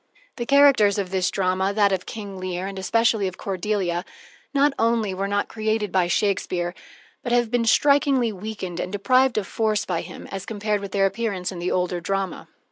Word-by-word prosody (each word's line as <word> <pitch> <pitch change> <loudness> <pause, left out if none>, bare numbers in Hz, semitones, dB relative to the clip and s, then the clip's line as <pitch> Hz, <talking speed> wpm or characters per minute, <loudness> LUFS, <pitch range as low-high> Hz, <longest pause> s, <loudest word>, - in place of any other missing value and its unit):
The 240 -2 -4
characters 275 -8 +5
of 190 -2 -2
this 185 -1 +1
drama, 190 +1 0
that 205 -2 +4
of 185 -1 -2
King 200 -3 -7
Lear, 185 0 -3
and 195 0 -5
especially 225 +1 +2
of 185 - -6
Cordelia, 190 -2 -2 0.5
not 285 0 +3
only 225 -3 +1
were 195 +1 -2
not 205 0 0
created 215 -2 -1
by 180 -2 +2
Shakespeare, 175 -2 0 0.5
but 240 - -4
have 240 -2 +2
been 240 -1 +1
strikingly 280 -1 +3
weakened 190 -3 -6
and 180 - -3
deprived 255 +5 +2
of 210 - 0
force 215 -1 0
by 175 -3 -1
him, 180 - -10
as 195 -1 -6
compared 210 -1 -1
with 200 -1 -6
their 195 0 +2
appearance 195 -3 -2
in 180 - -7
the 175 +1 -2
older 180 -1 -1
drama. 195 0 -3
200 Hz, 190 wpm, -23 LUFS, 185-225 Hz, 0.5 s, characters